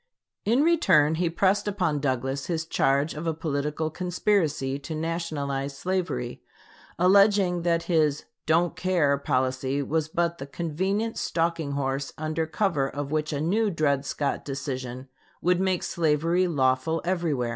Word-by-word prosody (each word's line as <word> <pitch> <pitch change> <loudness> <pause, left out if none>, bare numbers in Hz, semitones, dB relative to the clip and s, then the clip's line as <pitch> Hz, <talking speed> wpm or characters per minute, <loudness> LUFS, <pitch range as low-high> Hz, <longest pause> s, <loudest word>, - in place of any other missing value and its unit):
In 240 +7 +3
return 185 - +4
he 175 - +2
pressed 195 +4 +1
upon 180 -7 0
Douglas 135 0 -2
his 165 -2 -2
charge 140 -1 +1
of 155 +2 -5
a 160 - 0
political 155 0 -2
conspiracy 165 -6 0
to 160 +3 -6
nationalize 145 -4 -3
slavery, 185 - -2 0.6
alleging 190 -1 +4
that 170 -1 +1
his 155 -4 +1 0.2
"don't 165 +2 +2
care" 170 -7 +2
policy 130 +1 0
was 155 +2 -1
but 170 +1 -1
the 135 - -6
convenient 190 +9 -2
stalking 165 -3 -1
horse 135 0 -2
under 155 +1 -2
cover 155 -5 0
of 145 0 -5
which 155 -1 -1
a 145 - -2
new 205 +8 +1
Dred 145 -6 +1
Scott 140 0 -2
decision 130 -2 -5 0.3
would 180 0 +2
make 190 -2 0
slavery 165 +3 +1
lawful 135 +1 +1
everywhere. 165 -9 0
160 Hz, 140 wpm, -26 LUFS, 140-175 Hz, 0.6 s, return